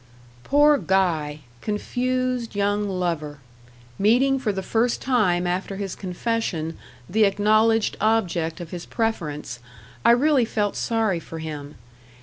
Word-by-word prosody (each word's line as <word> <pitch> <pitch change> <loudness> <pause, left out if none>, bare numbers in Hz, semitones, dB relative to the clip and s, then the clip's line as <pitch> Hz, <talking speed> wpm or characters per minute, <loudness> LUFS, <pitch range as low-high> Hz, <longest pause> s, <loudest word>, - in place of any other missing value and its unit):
Poor 290 +1 +4
Guy! 160 -6 0 0.2
confused 250 +2 -2
young 205 0 0
lover! 165 -6 -2 0.6
meeting 260 +6 +3
for 235 -5 0
the 190 -1 -4
first 230 +4 +1
time 195 -9 +1
after 185 +2 -2
his 195 -1 -4
confession 180 -4 -3 0.3
the 215 +4 +2
acknowledged 215 +2 +3
object 185 -7 +1
of 170 -2 -8
his 175 -1 -7
preference 150 - -3 0.4
I - - +5
really 265 +2 +4
felt 210 -2 -1
sorry 220 -6 0
for 165 - -9
him! 150 -2 -7
205 Hz, 125 wpm, -23 LUFS, 175-230 Hz, 0.6 s, I